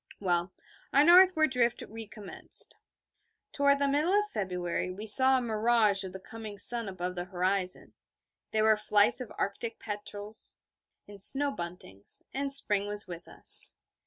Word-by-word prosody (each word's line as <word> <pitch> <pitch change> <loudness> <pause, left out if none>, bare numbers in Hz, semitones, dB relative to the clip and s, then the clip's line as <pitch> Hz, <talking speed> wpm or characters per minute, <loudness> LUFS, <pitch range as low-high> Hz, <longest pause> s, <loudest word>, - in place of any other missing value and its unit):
Well, 175 -2 -3 0.4
our 280 - +2
northward 345 -2 +3
drift 240 -2 -3
recommenced. 220 -2 -4 0.7
Toward 280 0 0
the 280 0 -2
middle 300 +6 -2
of 420 - -5
February 180 -3 -6
we 195 +4 -10
saw 260 +5 +7
a - - -4
mirage 220 -3 0
of 190 - -10
the 190 - -12
coming 215 +1 -12
sun 230 +1 +2
above 180 -1 -7
the 175 -1 -8
horizon; 185 0 -5 0.6
there 215 0 -2
were 220 0 +2
flights 210 +2 -1
of 245 - -10
Arctic 225 +3 -6
petrels 210 0 -9 0.5
and 200 -1 -7
snow 280 +7 +3
buntings; 170 - -6
and 275 +1 -4
spring 205 -7 +4
was 205 -1 -4
with 175 -1 -12
us. - - +8
210 Hz, 150 wpm, -26 LUFS, 190-250 Hz, 0.7 s, us